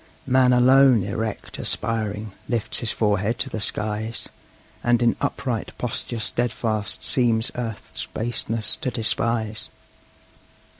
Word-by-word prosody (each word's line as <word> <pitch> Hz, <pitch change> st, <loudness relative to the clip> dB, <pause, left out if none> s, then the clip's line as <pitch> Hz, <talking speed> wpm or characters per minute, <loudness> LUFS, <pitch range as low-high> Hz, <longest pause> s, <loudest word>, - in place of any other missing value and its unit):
Man 130 Hz, 0 st, +4 dB
alone, 125 Hz, -2 st, +6 dB
erect, 105 Hz, +2 st, -4 dB
aspiring, 110 Hz, -2 st, -2 dB, 0.2 s
lifts 120 Hz, -3 st, +1 dB
his 115 Hz, -, +6 dB
forehead 105 Hz, +1 st, 0 dB
to -, -, -3 dB
the 110 Hz, -, -3 dB
skies, 110 Hz, +2 st, -2 dB, 0.6 s
And 120 Hz, -1 st, +3 dB
in 120 Hz, -1 st, +3 dB
upright 130 Hz, -5 st, -3 dB
posture 120 Hz, -1 st, -2 dB
steadfast 110 Hz, -1 st, -1 dB
seems 115 Hz, -3 st, +2 dB
earth's 115 Hz, -3 st, -5 dB
baseness 115 Hz, -1 st, -1 dB
to -, -, -2 dB
despise. 110 Hz, -1 st, -1 dB
115 Hz, 110 wpm, -23 LUFS, 110-120 Hz, 0.6 s, alone